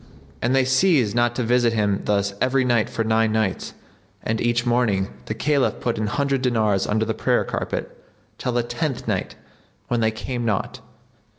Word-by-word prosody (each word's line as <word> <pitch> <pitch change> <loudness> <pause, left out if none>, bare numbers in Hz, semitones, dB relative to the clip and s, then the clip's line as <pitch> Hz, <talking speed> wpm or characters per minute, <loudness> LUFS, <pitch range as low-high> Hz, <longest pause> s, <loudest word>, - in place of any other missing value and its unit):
And 125 +3 +1
they 135 -1 +3
ceased 130 - +3
not 120 0 +1
to 125 - -1
visit 120 0 +2
him 105 -3 +1
thus 100 -1 +1
every 130 0 +2
night 120 -3 +2
for 115 - -2
nine 110 0 +2
nights; 110 -3 -1 0.5
and 115 0 -1
each 120 0 +1
morning 115 -6 +1 0.2
the 110 - -4
Caliph 145 +1 +1
put 120 -3 -2
an 110 - -1
hundred 140 +3 0
dinars 110 -6 +1
under 110 +1 +1
the 110 - -1
prayer - - +1
carpet, - - -4 0.4
till 125 - -2
the 120 0 +1
tenth 135 +2 -3
night, - - -2 0.5
when 120 - +1
they 110 -1 +3
came 120 +2 -4
not. 105 -4 -2
120 Hz, 180 wpm, -23 LUFS, 110-125 Hz, 0.5 s, they